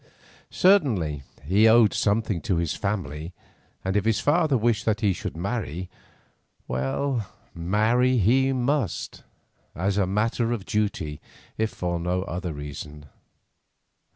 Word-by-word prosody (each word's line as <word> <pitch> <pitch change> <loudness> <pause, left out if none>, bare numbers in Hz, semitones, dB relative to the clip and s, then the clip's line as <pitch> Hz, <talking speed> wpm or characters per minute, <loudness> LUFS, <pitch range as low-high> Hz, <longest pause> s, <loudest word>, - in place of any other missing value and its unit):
Certainly 115 - +3 0.2
he 100 +9 +4
owed 110 -1 +6
something 105 -4 0
to 90 - 0
his 85 -2 0
family, 90 -6 -3 0.5
and 95 +1 -1
if 105 - +2
his 110 0 +2
father 145 -1 +3
wished 110 -1 +1
that 110 -1 +1
he 100 -3 +3
should 85 - -6
marry, 90 - -3 0.8
well, 105 - -1 0.2
marry 110 +9 +2
he 130 +6 +3
must, 130 - -1 0.5
as 95 +4 0
a 95 - +2
matter 115 +4 0
of 105 -5 -5
duty, 95 -8 -2 0.3
if 110 0 0
for 85 -4 -3
no 90 +2 -1
other 90 -1 -4
reason. 75 0 -8
100 Hz, 125 wpm, -25 LUFS, 85-115 Hz, 0.8 s, owed